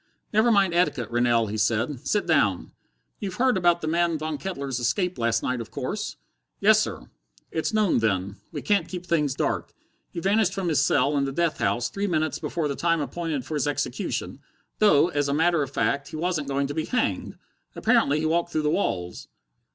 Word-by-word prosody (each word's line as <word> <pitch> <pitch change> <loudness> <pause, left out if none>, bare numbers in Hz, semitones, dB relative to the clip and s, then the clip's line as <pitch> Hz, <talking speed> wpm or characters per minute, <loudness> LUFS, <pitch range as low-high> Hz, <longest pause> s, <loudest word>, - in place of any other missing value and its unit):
"Never 220 +3 +4
mind 195 -5 +3
etiquette, 155 - +1
Rennell," 120 -1 +2
he 110 +1 -4
said. 115 +5 0
"Sit 210 - +1
down. 100 - +1 0.5
You've 195 -3 -4
heard 255 -1 +2
about 175 -2 +3
the 155 - -3
man 170 0 +1
Von 155 -1 -4
Kettler's 140 -6 -4
escape 180 - -1
last 115 -1 +1
night, 125 -1 -1
of 115 - -8
course?" 200 +10 -4 0.4
"Yes, 215 +1 +5
sir." - - -4 0.4
"It's - - -1
known, 215 - +2
then. 100 -2 -1
We 145 -5 -6
can't 195 +2 +2
keep 180 -1 -6
things 150 -6 +1
dark. - - -2 0.3
He - - -6
vanished 195 +1 +2
from 190 -3 -1
his 150 -4 +3
cell 145 +1 +2
in 140 - +1
the 135 - -3
death 170 +3 0
house, 120 0 +1
three 200 +10 -3
minutes 155 -4 0
before 155 0 -2
the 140 - -3
time 165 +1 +1
appointed 150 -2 -3
for - - -6
his 145 -2 0
execution, 145 - -3 0.4
though, 175 -6 +5
as 145 -4 0
a 140 - 0
matter 165 +1 +3
of 140 - -2
fact, 140 0 0
he - - -8
wasn't 160 -2 -1
going 140 0 0
to 140 - -4
be 155 +1 -2
hanged. 105 - -1 0.4
Apparently 145 +2 +3
he - - -1
walked 170 +2 +1
through 155 - 0
the 150 - +2
walls. 90 - -2
155 Hz, 200 wpm, -25 LUFS, 135-175 Hz, 0.5 s, Yes